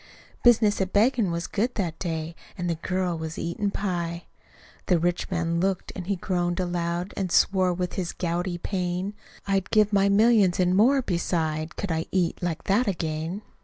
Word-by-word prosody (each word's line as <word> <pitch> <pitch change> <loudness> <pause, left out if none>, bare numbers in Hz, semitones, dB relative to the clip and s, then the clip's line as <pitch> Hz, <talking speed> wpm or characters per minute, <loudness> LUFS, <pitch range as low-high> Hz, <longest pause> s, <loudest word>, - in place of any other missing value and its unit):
Business 220 -4 +4
at 190 0 -1
beggin' 225 -1 +3
was 170 +1 -2
good 235 +5 -1
that 170 -6 -2
day, 165 -2 -3 0.2
An' 180 - -3
the 170 - +1
girl 180 +2 -2
was 160 0 -5
eatin' 185 +5 -2
pie. 175 -4 -3 0.6
The 180 - +4
rich 175 +1 -1
man 170 -2 0
looked, 190 +1 -1
an' 180 - -5
he 200 +2 0
groaned 175 -1 -1
aloud, 175 0 -2
An' 190 -2 -2
swore 185 +1 +3
with 180 0 -3
his 180 -3 -2
gouty 175 +1 -2
pain. 180 +1 -2 0.3
"I'd 195 -1 0
give 215 -1 +3
my 200 0 +4
millions, 205 -3 +4
an' 180 0 +3
more 260 +7 +4
beside, 165 -4 -1
Could 200 - -3
I 160 0 -1
eat 180 -3 0
like 175 -3 -2
that 210 +5 +2
again!" 165 +1 -3
180 Hz, 175 wpm, -26 LUFS, 170-200 Hz, 0.6 s, Business